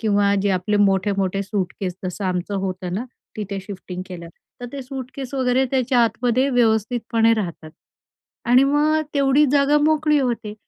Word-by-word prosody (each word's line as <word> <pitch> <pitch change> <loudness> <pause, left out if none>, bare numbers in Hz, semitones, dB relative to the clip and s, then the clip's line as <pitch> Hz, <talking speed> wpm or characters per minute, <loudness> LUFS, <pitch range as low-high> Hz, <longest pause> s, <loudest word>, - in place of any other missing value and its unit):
किंवा 205 -2 +2
जे 200 - +2
आपले 190 +3 0
मोठे-मोठे 195 0 0
सूटकेस, 190 -2 -3
जसं 185 +2 -4
आमचं 185 +2 -2
होतं 185 -1 -5
ना, 225 +6 -2 0.3
तिथे 200 -2 -4
शिफ्टिंग 185 -2 -7
केलं. 170 -3 -9 0.3
तर 245 - -5
ते 275 -1 -5
सूटकेस 265 0 -7
वगैरे 260 0 +2
त्याच्या 255 -2 +1
आतमध्ये 245 +4 0
व्यवस्थितपणे 225 0 +2
राहतात 170 -6 -5 0.8
आणि 255 +3 +6
मग 295 +2 +2
अ, - - 0
तेवढी 280 +1 +4
जागा 285 +1 +4
मोकळी 300 -1 +2
होते. 230 -5 -2
225 Hz, 150 wpm, -21 LUFS, 195-265 Hz, 0.8 s, आणि